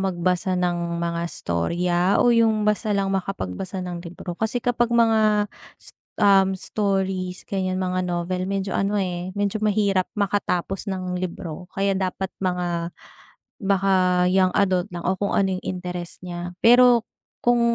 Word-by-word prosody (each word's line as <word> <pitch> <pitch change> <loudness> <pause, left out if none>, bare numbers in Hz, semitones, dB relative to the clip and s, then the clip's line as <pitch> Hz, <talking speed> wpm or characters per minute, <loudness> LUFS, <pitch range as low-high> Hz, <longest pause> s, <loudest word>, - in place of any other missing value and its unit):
magbasa 185 0 0
ng 175 -1 -1
mga 170 0 -1
storya 170 - -1 0.2
o 245 - +5
yung 225 -2 +3
basta 210 0 +1
lang 195 -1 0
makapagbasa 190 - -3
ng 180 -1 -5
libro? 175 0 -8
Kasi 225 +2 -1
kapag 240 -1 +2
mga 215 -2 +3 0.3
s - - -10 0.3
um, 195 -1 +5
stories, 190 -2 -2
ganyan, 185 -1 -2
mga 185 0 -1
novel, 180 +1 -2
medyo 195 0 -2
ano, 195 +3 0
eh, 185 -1 -2
medyo 205 +1 -1
mahirap 200 -3 +1
makatapos 195 -1 -1
ng 185 -2 -3
libro 180 -1 -5
kaya 195 0 +1
dapat 190 0 -2
mga 175 -2 -2 0.7
baka 190 -2 +2
young 185 -1 +3
adult 185 -3 +2
lang 175 - -5
o 185 - +2
kung 200 +1 -1
ano 190 -2 +1
yung - - -11
interes 180 -1 -5
niya. 175 0 -6
Pero 245 0 +7 0.4
kung 240 0 +3
185 Hz, 145 wpm, -23 LUFS, 180-200 Hz, 0.7 s, Pero